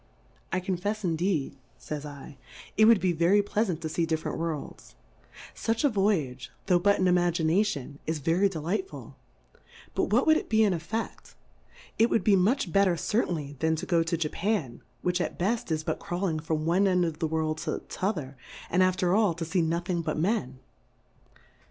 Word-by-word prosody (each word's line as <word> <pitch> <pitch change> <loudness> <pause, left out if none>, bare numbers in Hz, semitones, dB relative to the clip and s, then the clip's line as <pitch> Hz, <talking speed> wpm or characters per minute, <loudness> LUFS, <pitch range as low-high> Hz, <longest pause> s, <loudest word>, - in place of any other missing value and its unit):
I 185 - +1
confefs 195 +4 -2
indeed, 165 -5 -1 0.2
fa)'s 150 -1 -5
7, 145 0 -10 0.4
it 215 - +6
would 225 -2 +6
be 185 - +1
very 175 +5 +3
plea 210 +2 0
lant 175 -5 -3
to 160 - -3
fee 165 +1 -1
different 160 -1 -2
Worlds; 165 -3 -5 0.6
fuch 225 +3 -1
a 290 - +5
Voyage, 165 - 0 0.2
tho' 180 -2 +3
but 200 +3 +3
in 185 - +2
Imagination, 175 -4 +1
is 160 0 0
ve 155 +3 0
ry 195 +4 +3
delightful; 190 - -4 0.8
but - - +1
what - - +2
would 315 -1 +5
it - - -5
be 220 0 +4
in 205 -3 +3
EtfeQ:? 190 +7 -5 0.6
It 230 +2 +5
would 215 - +1
be 205 - +5
much 195 +1 +1
better 195 -3 +3
cer 220 +7 0
tainly 145 -5 -5
than 160 +2 +2
to 160 - -5
go 170 -2 +2
to 165 +1 -1
Jcifan^ 165 - -2 0.2
which 180 0 +1
at - - -3
beft, 215 +5 -1
is 155 -1 -1
but - - -2
crawling 175 -3 -2
from 155 0 -2
one 185 +4 +3
end 180 -2 +3
of 160 -1 -4
the 165 - 0
World 155 0 -1
to 160 -2 -3
t'other, 155 -9 -3 0.4
and 180 - +3
after 185 -1 +2
all 205 -5 +3
to 165 0 -4
fee 170 +3 +1
nothing 170 +2 -1
but 165 - -3
Men. 155 - -1
175 Hz, 185 wpm, -28 LUFS, 160-200 Hz, 0.8 s, it